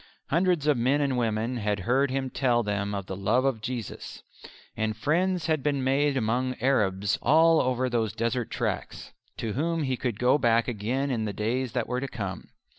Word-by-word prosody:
Hundreds 170 -1 +2
of 150 -3 +3
men 130 +5 +2
and 140 -3 +1
women 115 +1 -1
had 105 -3 -1
heard 130 +7 +2
him 135 0 -1
tell 120 -3 +1
them 100 -1 -2
of 100 -2 -4
the 95 - -5
love 110 +7 +1
of 130 -5 0
Jesus. 120 -2 -6 0.5
And 110 -1 -2
friends 175 +7 +1
had 155 -3 +1
been 140 -1 0
made 135 +1 +2
among 125 +2 0
Arabs 105 -6 +1
all 160 +2 +5
over 130 0 0
those 115 -4 0
desert 115 +1 -1
tracks, - - -4 0.3
to 110 -2 -3
whom 165 +4 -1
he 130 -2 0
could 120 -4 -3
go 125 +5 +3
back 115 -2 +3
again 125 +5 -1
in 115 -3 -1
the 105 - -3
days 120 +5 -2
that 125 -3 0
were 125 - -1
to 140 - -2
come. 100 -7 -6
125 Hz, 190 wpm, -27 LUFS, 110-140 Hz, 0.5 s, all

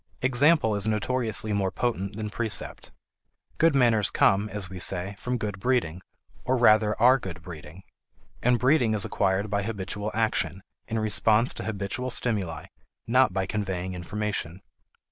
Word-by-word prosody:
Example 130 -2 +3
is 100 +1 +1
notoriously 110 -1 0
more 100 -2 0
potent 100 -3 -2
than 105 -1 -5
precept. 110 -2 -2 0.7
Good 165 -2 +4
manners 115 -5 +3
come, 100 +2 +2
as 105 -3 -3
we 95 0 -8
say, 95 +2 0
from 125 0 -2
good 105 -3 -4
breeding 100 -8 0 0.4
or 130 +1 +1
rather 110 -3 +4
are 125 +4 +5
good 85 -6 -8
breeding; 80 +1 -11 0.6
and 125 0 +3
breeding 125 -2 +2
is 100 - 0
acquired 100 +1 0
by 100 -1 +1
habitual 105 0 -4
action, 110 -4 -1 0.2
in 115 - -3
response 110 +2 +2
to - - -7
habitual 110 +4 -3
stimuli, 105 -9 -1 0.4
not 130 +1 +3
by 95 +1 -1
conveying 95 -2 -3
information. 95 -1 -4
105 Hz, 145 wpm, -26 LUFS, 95-120 Hz, 0.7 s, are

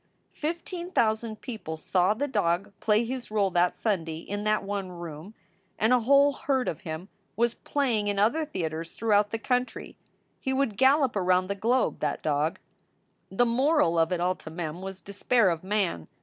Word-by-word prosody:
Fifteen 340 +3 -4
thousand 220 - 0
people 215 -10 -6
saw 180 +5 +2
the 285 +6 -1
dog 195 -5 0
play 215 +2 +2
his 250 0 -5
role 205 -3 +1
that 175 0 +2
Sunday 165 -7 -1
in 205 +5 -5
that 215 0 +2
one 200 -1 -3
room, 170 +3 -9 0.4
and 220 +3 +3
a 250 - +5
whole 280 +4 +5
herd 265 -2 -1
of 160 - -3
him 160 +3 -6 0.3
was 235 +2 +2
play 265 -6 0
ing 205 - -2
in 205 -1 0
other 230 +11 +2
theaters 165 - -4
throughout 210 -2 +2
the 225 - -2
country. 250 +2 -2 0.4
He 265 - -2
would 265 -6 0
gallop 265 +1 +4
around 185 -1 +2
the - - +1
globe, 235 +6 +1
that 150 -1 -2
dog. 150 +1 0 0.7
The 245 +6 +2
moral 240 - +2
of 165 +1 +2
it 180 - 0
all 180 +1 +2
to - - -10
Mem 165 +1 -5
was 190 0 -7
despair 200 +1 +2
of 165 0 -4
man. 190 - -1
205 Hz, 180 wpm, -27 LUFS, 175-245 Hz, 0.7 s, a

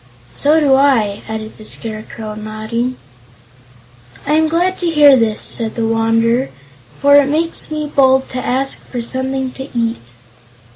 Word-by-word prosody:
"So 300 +3 +2
do 285 -3 +3
I," 245 -7 +2
added 220 0 -6
the - - -11
Scarecrow, 215 0 -5
nodding. 220 +4 -4 1.3
"I 295 - 0
am 315 +1 +3
glad 355 +4 0
to 350 - 0
hear 295 -3 +6
this," 225 -4 0
said 225 -2 0
the 230 - -1
Wanderer, 230 +3 +1 0.5
"for 285 0 +5
it 285 -1 +4
makes 330 +3 -1
me 305 -1 -3
bold 265 -2 +2
to 255 0 -5
ask 270 +2 -1
for 245 -2 -6
something 260 +1 -3
to 265 +2 -9
eat." 225 - -3
255 Hz, 150 wpm, -16 LUFS, 225-285 Hz, 1.3 s, hear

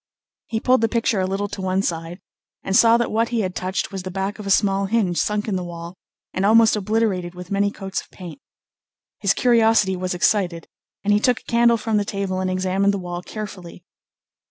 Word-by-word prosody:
He 220 - -2
pulled 255 +1 +3
the 225 - +2
picture 230 -2 0
a 185 - 0
little 195 +2 -2
to 195 - -6
one 190 +1 0
side, 165 0 -3 0.5
and 195 - -1
saw 230 +2 +6
that 235 - -1
what 225 +2 +1
he 235 -2 0
had 185 -2 -2
touched 185 +1 -3
was 195 -1 -5
the 185 - -6
back 195 +3 -3
of 205 - -7
a - - -2
small 195 0 +2
hinge 195 -5 +1
sunk 210 0 -1
in 205 - -1
the 185 - -2
wall, 170 0 -8 0.4
and 185 - -1
almost 220 +2 +5
obliterated 200 -4 -1
with 180 +1 -10
many 200 0 +2
coats 195 -1 -5
of - - -20
paint. 185 +8 -10 0.8
His 200 -2 +2
curiosity 225 -5 +3
was 185 0 -3
excited, 175 -2 +1 0.4
and 205 0 +2
he 205 - +4
took 245 +2 +1
a - - -30
candle 235 0 +3
from 220 -1 -1
the 205 - +1
table 195 -2 -3
and 185 0 -1
examined 190 +2 +1
the - - -2
wall 175 -1 -5
carefully. 185 -3 -8
195 Hz, 215 wpm, -22 LUFS, 185-220 Hz, 0.8 s, saw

